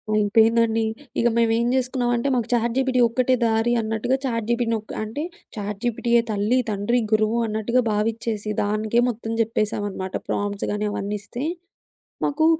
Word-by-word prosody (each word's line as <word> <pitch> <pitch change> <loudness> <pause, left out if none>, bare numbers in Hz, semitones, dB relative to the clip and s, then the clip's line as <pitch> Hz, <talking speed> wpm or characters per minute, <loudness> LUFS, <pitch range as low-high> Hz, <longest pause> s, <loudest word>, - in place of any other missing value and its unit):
అయిపేందండి. 225 +2 +3 0.4
ఇగ 235 - +3
మేమేం 230 0 +2
జేసుకున్నామంటే 245 -1 0
మాకు 240 -3 0
చాట్‌జీపిటీ 250 +2 +1
ఒక్కటే 255 +2 +2
దారి 225 +1 +2
అన్నట్టుగా, 225 +3 0
చాట్‌జీపిటీనొక 230 -2 -1
అంటే 220 +8 -4 0.3
చాట్‌జీపిటీయే 230 +3 0
తల్లి, 210 +4 +1
తండ్రి, 210 +4 +1
గురువు 215 +1 +2
అన్నట్టుగా 220 +3 +1
భావించ్చేసి 215 0 -1
దానికే 215 +3 +1
మొత్తం 225 -1 -4
జేప్పేసామనమాట. 205 -4 -2 0.2
ప్రాంప్ట్స్ 205 0 -2
గాని 210 0 -1
అవన్నీ 205 +1 -3
ఇస్తే 240 +5 -6 0.8
మాకు 300 +2 +1
225 Hz, 120 wpm, -23 LUFS, 210-240 Hz, 0.8 s, అయిపేందండి